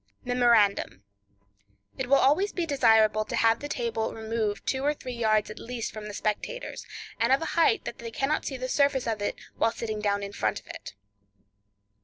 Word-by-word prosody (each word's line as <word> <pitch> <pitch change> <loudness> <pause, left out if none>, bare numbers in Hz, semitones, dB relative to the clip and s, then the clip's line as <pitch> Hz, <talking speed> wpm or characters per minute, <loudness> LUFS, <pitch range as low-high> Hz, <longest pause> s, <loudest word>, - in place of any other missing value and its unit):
Memorandum.—It 100 - -1
will 275 - +6
be - - +2
always 370 +10 +3
desirable 225 - +3
to - - -4
have 225 0 +3
the 290 - -6
table 230 -4 -2
removed 220 -2 -2
two 265 - -1
or 295 +1 +1
three 255 -3 -7
yards 215 -3 +1
at - - -9
least 235 -1 -5
from 215 -1 -7
the 210 - -7
spectators, 360 - -3 0.4
and 230 +3 +2
of 270 - +5
a - - -4
height 340 +5 +3
that - - -6
they 235 - -6
cannot 270 +6 -1
see 270 - -4
the 255 0 -4
surface 280 -1 +2
of 220 -3 -2
it 205 - -1 0.2
while 225 - +2
sitting 220 -2 -4
down 205 -1 0
in 200 0 -6
front 110 - -1
of - - -25
it. - - -9
225 Hz, 190 wpm, -27 LUFS, 210-265 Hz, 0.4 s, will